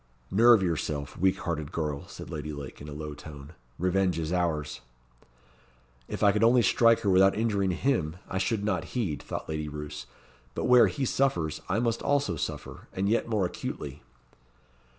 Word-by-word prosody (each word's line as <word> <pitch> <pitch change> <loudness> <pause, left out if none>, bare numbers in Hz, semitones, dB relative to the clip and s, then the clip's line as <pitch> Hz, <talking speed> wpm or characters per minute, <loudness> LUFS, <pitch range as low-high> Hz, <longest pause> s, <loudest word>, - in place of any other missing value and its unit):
"Nerve 115 0 +6
yourself, 75 -5 -2
weak 95 +1 +2
hearted 80 -3 -3
girl," 75 -4 -3
said - - -9
Lady 75 0 -4
Lake, 70 -3 -8
in 75 - -8
a - - -7
low 75 0 -6
tone. 75 0 -11 0.2
"Revenge 90 0 +1
is 80 +1 -2
ours." 80 -6 -1 1.3
"If - - -4
I 100 - +7
could 105 +2 +1
only 120 +1 +5
strike 115 0 +4
her 100 - 0
without 95 +1 +5
injuring 105 -4 +1
him, 90 - 0
I 95 - -2
should 100 +2 0
not 105 +4 -2
heed," 80 - -1
thought - - -6
Lady 75 -1 -3
Roos. 75 0 -7 0.5
"But - - -2
where 125 -1 +7
he 140 -3 -2
suffers, 90 - 0
I 95 - +1
must 115 0 0
also 140 -11 +1
suffer, - - -6
and 95 +1 -1
yet 115 +1 +1
more 105 -4 +1
acutely." 75 -4 -5
90 Hz, 170 wpm, -28 LUFS, 75-110 Hz, 1.3 s, I